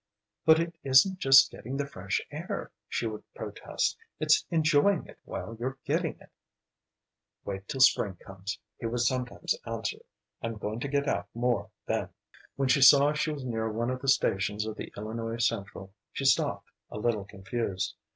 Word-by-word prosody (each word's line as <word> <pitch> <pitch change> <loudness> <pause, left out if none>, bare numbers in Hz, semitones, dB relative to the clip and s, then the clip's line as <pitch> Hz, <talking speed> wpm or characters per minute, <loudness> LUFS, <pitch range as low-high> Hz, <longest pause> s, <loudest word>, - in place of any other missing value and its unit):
"But 160 0 +8
it 165 0 -1
isn't 140 +8 +5
just 135 -3 +7
getting 130 +4 -6
the 145 - -1
fresh 100 -8 -3
air," - - -5 0.2
she - - -1
would 110 -1 -4
protest, - - -2 0.2
"it's - - +3
enjoying 160 +4 +3
it - - -15
while 115 - -6
you're 130 +2 -3
getting - - 0
it." - - -18 1.1
"Wait 100 0 -5
till 135 - -3
spring 100 -6 +5
comes," 95 +4 -7 0.2
he 115 - -2
would 120 +1 -1
sometimes 125 0 0
answer. 115 -3 -3 0.4
"I'm 115 -1 -3
going 105 +2 -4
to 140 - -3
get 140 +1 0
out - - 0
more 120 0 0 0.2
then." - - -1 0.5
When 135 -1 0
she 130 +2 +4
saw 140 +2 +8
she 150 +1 0
was 140 -3 -5
near 110 -2 -2
one 120 +3 -1
of 130 0 -4
the 135 - -5
stations 105 -4 +2
of 110 -1 -4
the - - -7
Illinois 115 +2 -4
Central 100 -4 -2 0.2
she 135 - -4
stopped, 135 - +2 0.2
a - - -7
little 105 -2 0
confused. 100 -1 -3
120 Hz, 170 wpm, -29 LUFS, 105-135 Hz, 1.1 s, But